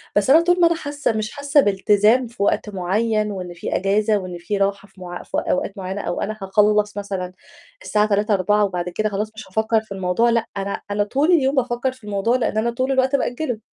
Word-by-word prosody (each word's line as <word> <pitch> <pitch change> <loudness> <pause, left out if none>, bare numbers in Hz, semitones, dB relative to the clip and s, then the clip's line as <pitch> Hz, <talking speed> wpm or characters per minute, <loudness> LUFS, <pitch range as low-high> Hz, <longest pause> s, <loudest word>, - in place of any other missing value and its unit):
بس 205 +5 +2
أنا 315 +4 +7
طول 355 +1 +2
ما 340 - +7
أنا 335 - +1
حاسّة 290 -4 -2
مش 215 -1 -3
حاسّة 285 0 +1
بإلتزام 210 +4 +3
في 230 -3 -4
وقت 210 - 0
معيّن 210 +3 0
وإن 180 -2 -6
في 170 - -4
أجازة 205 +2 +2
وإن 180 -2 -6
في 200 +4 -3
راحة 200 0 -1
في 195 -1 -19
مع 175 0 -7
في - - -4
أوقات 195 - -1
معيّنة 195 +1 -4
أو - - -3
أنا 215 +1 -3
هاخلّص 210 +1 +2
مثلًا 195 -3 -4 0.5
الساعة 210 - +2
15:00، 210 +2 +1
16:00 205 +2 +2
وبعد 180 -2 -3
كده 215 +4 -1
خلاص 210 +2 -3
مش 220 - -9
هافكّر 220 +3 +1
في 220 - -24
الموضوع، 190 +5 +1
لأ، 230 -1 +1
أنا 195 0 -3
أنا 205 0 +1
طول 280 - +1
اليوم 280 -4 +3
بافكّر 250 0 0
في 255 -2 -18
الموضوع 210 +4 +1
لإن 225 -3 -1
أنا 235 +2 +1
طول 255 +3 -1
الوقت 265 +1 +2
بأجِّله. 250 -2 -2
210 Hz, 220 wpm, -21 LUFS, 195-240 Hz, 0.5 s, أنا